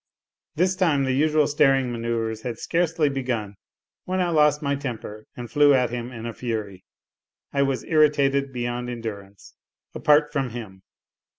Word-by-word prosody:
This 180 Hz, +3 st, +2 dB
time 165 Hz, -7 st, +2 dB
the 130 Hz, -, 0 dB
usual 150 Hz, +3 st, +3 dB
staring 135 Hz, -4 st, +2 dB
mano3uvres 115 Hz, -1 st, -2 dB
had 120 Hz, -1 st, -5 dB
scarcely 165 Hz, -2 st, 0 dB
begun 125 Hz, -7 st, -2 dB, 0.5 s
when 185 Hz, +1 st, -1 dB
I 180 Hz, -1 st, +1 dB
lost 150 Hz, -2 st, +3 dB
my 140 Hz, 0 st, 0 dB
temper 115 Hz, -6 st, -6 dB
and 120 Hz, -1 st, -6 dB
flew 145 Hz, +1 st, +5 dB
at 125 Hz, -3 st, +1 dB
him 120 Hz, 0 st, -5 dB
in 115 Hz, -2 st, -8 dB
a 115 Hz, -, -4 dB
fury. 110 Hz, -6 st, -5 dB, 0.7 s
I 140 Hz, -, +2 dB
was 135 Hz, -1 st, 0 dB
irritated 140 Hz, -3 st, +2 dB
beyond 120 Hz, 0 st, -3 dB
endurance 100 Hz, -5 st, -8 dB, 0.4 s
apart 150 Hz, 0 st, +3 dB
from 135 Hz, -4 st, -1 dB
him. 110 Hz, -5 st, -9 dB
130 Hz, 155 wpm, -24 LUFS, 115-150 Hz, 0.7 s, flew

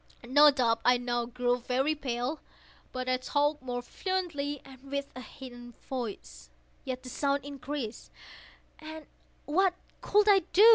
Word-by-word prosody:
No 290 Hz, +4 st, +8 dB
doubt 235 Hz, -5 st, +2 dB
I 250 Hz, 0 st, +5 dB
now 240 Hz, -1 st, -1 dB
grew 245 Hz, 0 st, +1 dB
very 260 Hz, +5 st, +1 dB
pale;—but 255 Hz, -1 st, -5 dB
I 255 Hz, 0 st, +3 dB
talked 290 Hz, +3 st, +1 dB
more 245 Hz, -1 st, -3 dB
fluently, 310 Hz, -4 st, -2 dB
and 265 Hz, -1 st, -13 dB
with 280 Hz, 0 st, -3 dB
a 255 Hz, -, -6 dB
heightened 245 Hz, -3 st, -10 dB
voice. 130 Hz, -, -6 dB, 0.3 s
Yet 255 Hz, -1 st, -4 dB
the 255 Hz, -, -7 dB
sound 280 Hz, +1 st, 0 dB
increased—and 290 Hz, +3 st, -8 dB, 0.4 s
what 365 Hz, +4 st, +3 dB, 0.3 s
could 420 Hz, 0 st, +4 dB
I 400 Hz, -2 st, +8 dB
do? 425 Hz, +5 st, +9 dB
265 Hz, 135 wpm, -30 LUFS, 245-295 Hz, 0.4 s, do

